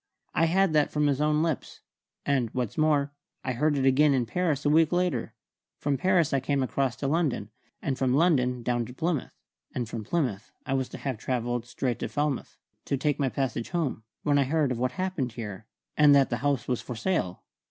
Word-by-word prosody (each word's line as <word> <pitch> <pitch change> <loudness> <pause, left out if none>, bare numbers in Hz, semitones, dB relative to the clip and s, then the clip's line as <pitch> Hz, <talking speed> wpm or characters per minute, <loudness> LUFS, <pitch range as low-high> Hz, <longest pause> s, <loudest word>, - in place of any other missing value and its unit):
I 165 - +3
had 185 +1 +3
that 150 -1 +3
from 150 0 0
his 145 -1 +1
own 150 +1 +2
lips; 160 -4 -3 0.4
and, 130 -5 +1
what's 125 -4 -2
more, 150 -2 +2 0.3
I 130 - -1
heard 145 +4 +1
it 135 - +1
again 140 +2 +5
in 125 -2 +1
Paris 155 0 -1
a - - +4
week 160 0 +4
later. 180 -1 0 0.4
From 145 -1 0
Paris 175 +1 +2
I 135 - +3
came 135 +1 0
across 130 -1 0
to 140 - -3
London, 140 -9 0 0.3
and 135 -2 -1
from 130 -1 +2
London 125 -7 +2
down 120 0 0
to 125 - -11
Plymouth, 160 -1 -2 0.4
and 120 -3 -2
from 115 -1 -5
Plymouth 120 - -1 0.2
I 135 - -1
was 130 -1 0
to - - -8
have 130 -6 -4
travelled 120 -1 -2
straight 125 -1 -2
to - - -3
Falmouth, 145 -2 -2 0.3
to 140 - 0
take 145 +2 0
my 135 -2 +2
passage 125 -4 -2
home, 160 -10 -1 0.2
when 145 -2 +3
I 140 - +3
heard 150 -1 +1
of 120 - -2
what 125 0 0
had 185 - -2
happened 155 -11 -2
here, 110 -2 -7 0.3
and 150 -1 +7
that 135 -2 +4
the 120 - +1
house 140 0 0
was 125 -2 -1
for 125 - -6
sale. 110 - -1
140 Hz, 215 wpm, -27 LUFS, 125-150 Hz, 0.4 s, and